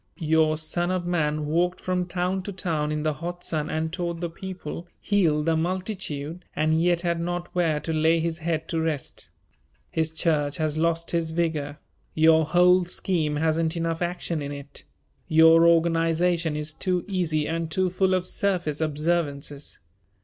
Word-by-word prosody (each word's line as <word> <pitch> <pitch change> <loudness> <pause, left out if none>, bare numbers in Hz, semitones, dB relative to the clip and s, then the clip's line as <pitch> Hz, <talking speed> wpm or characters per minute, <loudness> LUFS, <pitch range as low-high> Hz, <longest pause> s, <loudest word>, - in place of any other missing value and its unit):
Your 155 -2 +2
Son 175 +3 -1
of 185 -1 -1
Man 155 -3 0
walked 175 +4 0
from 180 -1 -1
town 180 +1 -1
to 200 - -6
town 160 -5 -1
in 150 0 -2
the 155 -1 +1
hot 175 +4 -6
sun 155 -2 -2
and 160 +1 -2
taught 170 -2 -3
the 170 -1 -3
people, 175 -2 -7
healed 165 -7 +2
the 165 -1 +2
multitude 180 -2 -3
and 155 +1 +2
yet 175 0 +2
had 170 -1 0
not 175 +1 -3
where 165 -4 +1
to 160 - -3
lay 160 +1 +3
his 165 0 -2
head 160 -1 -2
to 165 - -1
rest. 155 -4 -4 0.6
His 160 0 0
church 155 -3 0
has 155 -1 0
lost 165 +1 0
His 170 -2 0
vigor. 160 -3 -2 0.4
Your 160 0 +5
whole 180 +3 +5
scheme 170 -4 -1
hasn't 160 +2 +1
enough 165 0 -2
action 175 -2 -2
in 140 0 -4
it. 140 - -9 0.4
Your 160 +1 +6
organization 165 0 +2
is 150 +1 -3
too 180 +1 -1
easy 165 -6 0
and 165 0 -2
too 185 +2 0
full 185 +1 +2
of 185 -1 -1
surface 175 -6 -1
observances. 150 - -2
165 Hz, 165 wpm, -25 LUFS, 155-175 Hz, 0.6 s, Your